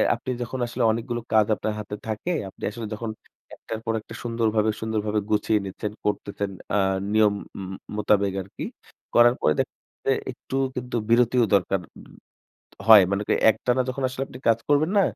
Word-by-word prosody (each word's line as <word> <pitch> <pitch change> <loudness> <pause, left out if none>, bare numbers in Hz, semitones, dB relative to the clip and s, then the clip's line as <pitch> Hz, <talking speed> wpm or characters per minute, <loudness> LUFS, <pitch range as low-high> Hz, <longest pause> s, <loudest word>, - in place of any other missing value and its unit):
আপনি 120 +2 -8
যখন 120 +2 -4
আসলে 120 +1 -2
অনেকগুলো 120 +1 -3
কাজ 110 -1 +6
আপনার 110 - -2
হাতে 105 0 -5
থাকে, 110 +11 -2 0.2
আপনি - - -17
আসলে 115 0 -6
যখন 110 +1 -4 0.5
একটার 110 - -6
পর 115 - 0
একটা 115 - -12
সুন্দরভাবে, 110 -2 +1
সুন্দরভাবে 110 -1 0
গুছিয়ে 105 0 +2
নিচ্ছেন, 100 +2 -4
করতেছেন 100 -1 -2 0.3
আ - - +4 0.4
নিয়ম 110 -1 +5 0.4
ম - - -6
ম - - -5 0.2
মোতাবেক 100 -2 +2
আরকি। 95 +1 -7 0.5
করার 120 +1 +7
পরে 75 - +4
দেখা - - -1
যাচ্ছে - - -88
যে - - +5 0.2
একটু 135 - -6 0.2
কিন্তু 125 0 -4
বিরতিও 120 +1 +4
দরকার 95 -1 +1 0.2
উব - - -13 0.7
ত - - -20
হয়। 110 -3 +10
মানে 100 +1 0
করেন - - +2
একটানা 125 +3 +1
যখন 130 +2 -3
আসলে 130 +1 -5
আপনি 125 - -11
কাজ 115 -1 +5
করবেন 145 +3 +3
না? - - +6
110 Hz, 180 wpm, -25 LUFS, 105-120 Hz, 0.7 s, হয়